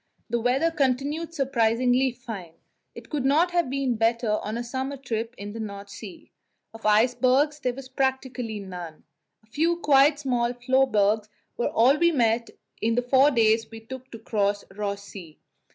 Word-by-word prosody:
The 235 - +1
weather 260 +8 +1
continued 290 +3 -1
surprisingly 250 -1 +2
fine; 225 -9 -8 0.4
it - - -11
could 295 -4 -1
not 310 +6 +3
have 345 -6 +1
been 265 -3 -1
better 225 -1 +1
on 215 +2 -4
a 240 - -3
summer 265 +3 -4
trip 235 -2 -4
in 205 +1 -7
the 225 - -7
North 200 -2 -7
Sea. 200 -2 -11 0.4
Of 225 -1 -4
icebergs 255 +7 +3
there 250 -3 -2
was 270 -1 -9
practically 260 -4 -2
none; 180 -5 -8 0.4
a - - -25
few 325 +9 0
quite 285 -2 +4
small 245 -4 0
floebergs 230 -5 +2 0.3
were 240 - -1
all 260 +6 +4
we 340 0 +4
met 230 -5 +1
with - - -17 0.2
in 225 +1 +1
the 245 - +1
four 265 +3 +5
days 225 -3 +2
we 225 - -9
took 260 +3 -10
to 230 - -9
cross 205 -2 -1
Ross 200 -1 -3
Sea. 180 -6 -11
245 Hz, 170 wpm, -25 LUFS, 220-270 Hz, 0.4 s, four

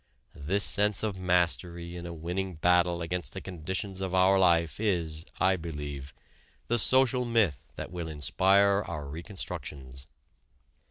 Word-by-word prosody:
This 95 +8 -1
sense 105 0 +2
of 100 -4 -2
mastery 85 -1 0
in 85 0 -6
a - - -6
winning 90 +3 -4
battle 90 +1 +2
against 90 +1 -3
the 95 - -5
conditions 95 +2 -5
of 95 -1 -2
our 95 +1 +5
life 85 -2 +3
is, 85 -7 0
I 95 0 +3
believe, 75 -4 -6 0.6
the 120 0 +3
social 130 +1 +3
myth 110 - +1
that - - -6
will 85 -2 -5
inspire 100 +6 +3
our 75 -4 -5
reconstructions. 70 -6 -6
90 Hz, 140 wpm, -29 LUFS, 80-95 Hz, 0.6 s, our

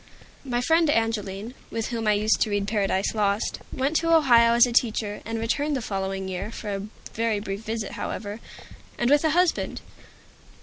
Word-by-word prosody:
My 245 -3 -1
friend 325 +4 +3
Angeline, 225 -3 -1 0.2
with 225 -1 -3
whom 230 -2 -3
I 210 - +5
used 215 +2 +2
to - - +2
read 205 -1 -1
"Paradise 195 -2 0
Lost," 205 -1 0
went 275 +4 -1
to 330 0 0
Ohio 240 -8 +6
as 235 - +7
a 245 - -3
teacher, 220 -3 0
and 225 +1 -3
returned 280 +6 0
the - - -2
following 195 -3 -3
year, 190 +2 -4
for 210 -2 -6
a 195 - -2 0.3
very 225 -2 0
brief 200 0 -5
visit, 220 -1 -4
however, 205 +1 -5 0.6
and 240 +2 +1
with 290 +1 +5
a 315 - +3
husband. 350 +2 +1
225 Hz, 180 wpm, -25 LUFS, 205-250 Hz, 0.6 s, as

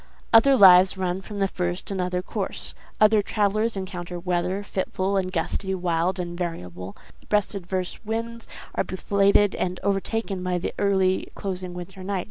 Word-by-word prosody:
Other 270 +5 +7
lives 190 -3 +7
run 185 0 -1
from 205 +1 -8
the 195 -1 +2
first 180 0 -3
another 180 -1 -1
course. - - -4 0.3
Other 215 0 +5
travellers 215 +2 0
encounter 180 -2 -5
weather 180 +2 -1
fitful 190 0 -2
and 185 -1 0
gusty, 190 +2 -2
wild 175 +1 0
and 175 -1 -4
variable—breast 135 - -4
adverse 185 0 -4
winds, 230 +1 -4 0.3
are - - 0
belated 200 +1 +2
and 180 0 -2
overtaken 200 0 -1
by 180 0 -1
the 175 - -3
early 190 -2 +2
closing 185 -2 -5
winter 185 +2 -8
night. 195 0 -2
190 Hz, 145 wpm, -25 LUFS, 180-200 Hz, 0.3 s, Other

